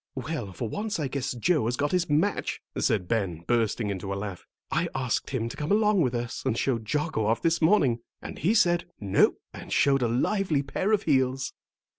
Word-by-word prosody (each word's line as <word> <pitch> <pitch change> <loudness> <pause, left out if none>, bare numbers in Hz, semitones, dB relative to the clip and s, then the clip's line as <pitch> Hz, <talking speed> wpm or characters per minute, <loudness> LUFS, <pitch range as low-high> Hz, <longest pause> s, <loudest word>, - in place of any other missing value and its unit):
"Well, 130 -5 -4
for 110 +6 -4
once 210 - -3
I 145 - 0
guess 135 -1 -3
Joe 145 +3 +1
has 120 +2 -1
got 145 +1 0
his 180 -3 +1
match," 160 +8 +1 0.2
said 95 -5 +1
Ben, 95 -7 -1
bursting 115 -2 +1
into 95 0 -4
a - - -1
laugh. 100 -3 -6 0.2
"I - - +1
asked 125 -3 -1
him 125 -4 -1
to - - -7
come 150 +3 -3
along 210 -2 +4
with 125 -5 +1
us 120 0 -3
and 130 -4 0
show 125 -3 +1
Jocko 115 0 -1
off 115 +1 +1
this 165 +1 +2
morning, 155 - +4 0.2
and - - -8
he 190 +10 +2
said, 175 -5 +3
'No,' 100 -2 +3 0.2
and - - -10
showed 135 -1 +3
a 120 - +2
lively 150 - +1
pair 185 +9 -1
of 215 -2 +2
heels." 135 -2 +1
135 Hz, 205 wpm, -27 LUFS, 115-165 Hz, 0.2 s, along